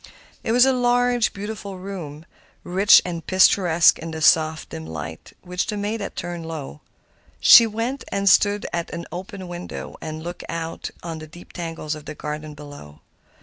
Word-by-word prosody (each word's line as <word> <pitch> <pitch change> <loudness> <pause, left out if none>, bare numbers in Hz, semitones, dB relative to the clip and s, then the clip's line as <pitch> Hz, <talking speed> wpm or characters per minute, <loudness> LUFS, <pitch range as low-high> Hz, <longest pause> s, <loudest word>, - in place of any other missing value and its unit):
It - - -1
was 245 +2 +6
a 265 - +3
large, 245 -1 +2
beautiful 200 -1 -6
room, 170 -5 -8 0.4
rich 195 +3 +5
and 170 -2 -4
picturesque 180 -2 +4
in 165 - -6
the 160 0 -5
soft, 155 0 +3
dim 80 0 -7
light 80 0 -8
which 180 0 -3
the 210 - -3
maid 210 +2 -3
had - - -5
turned 170 -1 -5
low. 150 -2 -7 0.6
She 230 - +9
went 230 +5 -3
and 200 0 -2
stood 205 +1 +4
at 170 -1 -2
an 170 0 -6
open 185 +1 -7
window 175 0 -7
and 155 0 -6
looked 175 +1 -7
out 165 0 -4
upon 165 -2 -7
the 155 - -9
deep 175 +3 -14
tangle 165 -3 -6
of 155 -1 -4
the 155 - -7
garden 150 0 -6
below. 145 - -12
175 Hz, 175 wpm, -23 LUFS, 155-200 Hz, 0.6 s, She